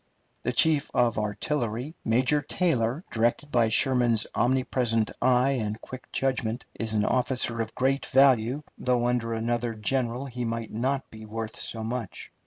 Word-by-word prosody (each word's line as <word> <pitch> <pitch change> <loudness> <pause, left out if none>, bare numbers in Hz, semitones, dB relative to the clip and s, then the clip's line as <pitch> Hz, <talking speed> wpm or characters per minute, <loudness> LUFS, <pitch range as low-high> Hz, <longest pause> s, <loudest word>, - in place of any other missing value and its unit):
The - - -1
chief 155 -3 +3
of 120 -3 +2
artillery, 120 +5 -2
Major 125 +6 +2
Taylor, 140 -4 0
directed 120 +6 0
by 115 -2 +3
Sherman's 120 -2 +3
omnipresent 120 -3 +1
eye 125 +1 +4
and 105 0 -3
quick 130 +2 -10
judgment, 125 -3 -1
is 110 -1 -2
an 105 0 +2
officer 125 -2 +1
of 110 0 -5
great 135 +2 0
value, 130 0 +4 0.2
though 125 -1 +1
under 120 -2 0
another 115 +1 -1
general 120 +3 -1
he 125 -2 -5
might 115 -1 -3
not 130 +5 -1
be 110 0 -10
worth 110 0 -5
so 110 -1 -4
much. 115 -2 -5
120 Hz, 150 wpm, -27 LUFS, 115-130 Hz, 0.2 s, eye